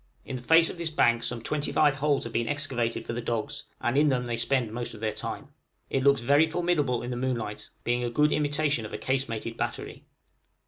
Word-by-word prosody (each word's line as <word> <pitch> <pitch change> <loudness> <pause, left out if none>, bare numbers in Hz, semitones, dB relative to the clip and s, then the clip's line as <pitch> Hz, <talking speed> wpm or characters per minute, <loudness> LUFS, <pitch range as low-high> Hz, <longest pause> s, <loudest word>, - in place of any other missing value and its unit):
In 130 - -5
the 125 - -5
face 165 +6 +6
of 175 - -11
this 170 -1 -1
bank 120 -6 +3
some 120 -1 -2
twenty 150 +2 -1
five 145 -2 +3
holes 145 0 +1
have 115 - -7
been 115 0 0
excavated 135 -6 -1
for - - -4
the 120 - -3
dogs, 115 -2 -3
and 120 - 0
in 150 +1 +5
them 125 -2 0
they 120 -1 -2
spend 120 -1 0
most 120 -1 -4
of - - -11
their 110 -1 -1
time. - - -6 0.4
It 135 - +1
looks 140 -2 +4
very 145 +6 +4
formidable 160 -8 0
in 120 - -4
the - - -2
moonlight, 120 -5 -3
being 120 +1 0
a 120 - 0
good 150 +5 +3
imitation 145 -3 +1
of 110 - -8
a - - -2
casemated 115 -4 -2
battery. - - -4
125 Hz, 225 wpm, -27 LUFS, 120-145 Hz, 0.4 s, face